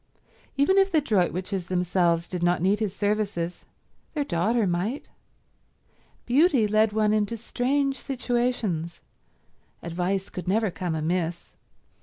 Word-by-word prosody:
Even 380 +8 +4
if 390 0 +3
the 320 - +4
Droitwiches 190 - -1
themselves 175 -2 +1
did 180 -2 -4
not 175 0 +2
need 195 +4 +2
his 210 -3 -2
services, 205 -4 -2 0.5
their 295 - +1
daughter 215 +3 +1
might. 190 +10 -2 1.2
Beauty 265 -3 +4
led 215 +1 +3
one 215 0 +2
into 215 +2 0
strange 270 +4 0
situations; 240 - -2 0.8
advice 180 +3 -2
could 180 - -7
never 210 +1 +1
come 170 -1 -3
amiss. 170 +2 -2
205 Hz, 120 wpm, -26 LUFS, 175-240 Hz, 1.2 s, Even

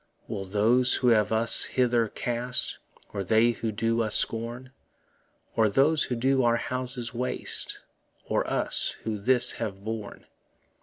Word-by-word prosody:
Will 95 - -5
those 115 +6 +2
who 125 - +1
have 105 -2 +3
us 115 +1 +2
hither 120 -3 +1
cast? 120 +3 0 0.3
Or 100 - -3
they 110 +4 +3
who 115 -1 -4
do 115 +2 -1
us 110 -2 +3
scorn? 120 +3 -1 0.8
Or 110 -2 +3
those 145 +8 +2
who 125 - -3
do 130 +3 +1
our 120 -1 +2
houses 125 -1 -2
waste? 125 +1 -1 0.4
Or - - -1
us - - -2
who 110 -2 -3
this 125 +4 +4
have 100 -3 -5
borne? 110 -2 -6
115 Hz, 145 wpm, -26 LUFS, 110-125 Hz, 0.8 s, this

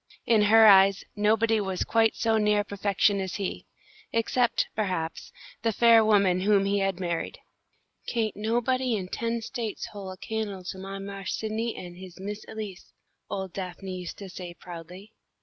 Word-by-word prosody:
In 225 -2 +4
her 220 +2 +7
eyes, 195 -1 +7
nobody 220 +1 +2
was 190 -2 -2
quite 225 -1 +2
so 225 -1 +2
near 210 -1 +3
perfection 200 0 +1
as 190 -1 -4
he, 195 -2 -4 0.4
except, 235 +1 +1
perhaps, 180 -6 -3 0.3
the 225 - +1
fair 230 +1 +6
woman 200 -4 +4
whom 200 +1 +3
he 200 +1 +1
had 195 -2 0
married. 170 -2 -3 0.7
"Kain't 225 -3 -1
nobody 240 +3 0
in 185 -3 -4
ten 230 +1 -2
States 230 -4 -4
hole 200 -2 -7
a 185 - -8
can'le 210 -2 -4
to 190 - -10
my 195 +1 -6
Marse 195 0 -5
Sidney 220 +1 -2
an' 175 -1 -8
his 185 -1 -11
Miss 205 +2 -5
Elise," 210 -4 -8 0.4
old 190 -2 -4
Daphne 185 0 -5
used 180 - -7
to 200 - -8
say, 180 -1 -8
proudly. 180 +4 -10
205 Hz, 165 wpm, -27 LUFS, 190-220 Hz, 0.7 s, her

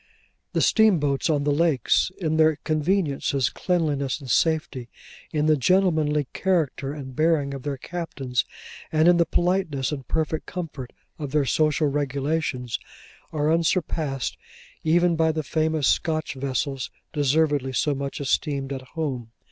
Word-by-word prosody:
The - - +1
steamboats 165 -11 +3
on 145 -2 +2
the 145 - +1
lakes, 150 0 +2
in 160 -3 -1
their 160 -1 +5
conveniences, 155 - 0
cleanliness, 150 -7 0
and 135 -4 -5
safety; 160 -7 +1 0.4
in 150 -1 0
the 155 0 +5
gentlemanly 155 -2 +2
character 160 -7 0
and 135 -3 -8
bearing 155 -3 +2
of 135 - -6
their 140 0 -3
captains; 135 -7 -3 0.5
and 155 +1 +3
in 175 0 +6
the 170 - +3
politeness 175 -7 0
and 135 -4 -5
perfect 160 0 -1
comfort 155 -8 -6 0.3
of 145 -3 -4
their 150 -2 +3
social 155 +2 +2
regulations; 140 -2 -1 0.5
are 155 +1 +1
unsurpassed 160 -5 0 0.5
even 170 +2 +3
by 160 0 +3
the 155 0 -3
famous 155 -1 0
Scotch 155 -1 0
vessels, 135 -1 -2 0.2
deservedly 145 -2 +2
so 145 +3 +1
much 140 0 -4
esteemed 140 0 -1
at 135 - -5
home. 130 -4 -4
150 Hz, 140 wpm, -24 LUFS, 140-160 Hz, 0.5 s, in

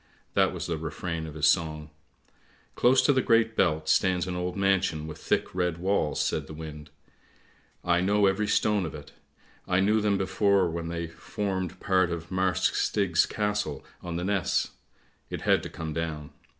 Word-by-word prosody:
" - - -39
That - - +3
was - - -5
the 85 -2 -2
refrain 80 +1 -4
of 75 - -9
his 75 -1 +2
song. 75 -3 +1 0.4
" - - -34
Close 130 +2 +4
to 145 - +4
the 130 - +3
Great 115 -1 +3
Belt 80 -4 +1
stands 90 0 +2
an 90 -1 -4
old 90 +1 -3
mansion 95 -5 +1
with 80 - -8
thick - - -1
red 90 -2 0
walls," 90 -4 0
says - - 0
the 80 - -9
wind. 75 -1 -8 0.5
" - - -32
I 90 - +2
know 100 +2 +3
every 100 +2 +1
stone 105 -3 +2
of 80 - -8
it, 75 -2 -10 0.6
I 90 0 +2
knew 105 +3 +3
them 105 -1 +2
before 95 0 +2
when 85 0 -4
they 85 0 -3
formed 95 +2 -4
part 95 -2 +2
of 85 0 -5
Marsk 95 -2 +1
Stig's 95 -6 +2
Castle 105 -9 -2 0.2
on 85 -1 -5
the 85 - -2
Ness; 95 -3 0 0.6
it - - -5
had - - +3
to - - -7
come 80 -1 -5
down. 80 -2 -4
90 Hz, 190 wpm, -27 LUFS, 80-100 Hz, 0.6 s, Close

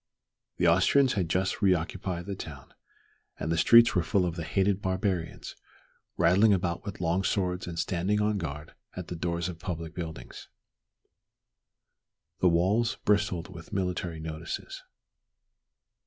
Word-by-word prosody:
The 90 - +1
Austrians 125 +11 +4
had 90 -5 -1
just 95 +5 0
re 95 -3 +5
occupied 85 +1 -4
the 100 - -4
town, - - -9 0.7
and 80 - -2
the 85 - +1
streets 115 +6 +7
were 90 - +2
full 90 +3 +1
of 85 -1 -2
the 85 - -4
"hated 95 +4 +1
barbarians," 95 -3 -2 0.6
rattling 95 +6 +5
about 85 -2 -1
with 100 -1 -7
long 90 +2 0
swords 90 -2 -1
and 85 -1 -6
standing 95 +5 0
on 105 -1 +1
guard 75 -2 -6 0.2
at 90 -2 -7
the 90 - -4
doors 85 0 -2
of 85 -2 -7
public 85 -3 -5
buildings. 80 -7 -8 1.9
The 90 - +4
walls 105 +9 +2
bristled 95 -4 +1
with 85 -2 -11
military 90 -3 -2
notices. 80 +1 -6
90 Hz, 140 wpm, -28 LUFS, 85-100 Hz, 1.9 s, streets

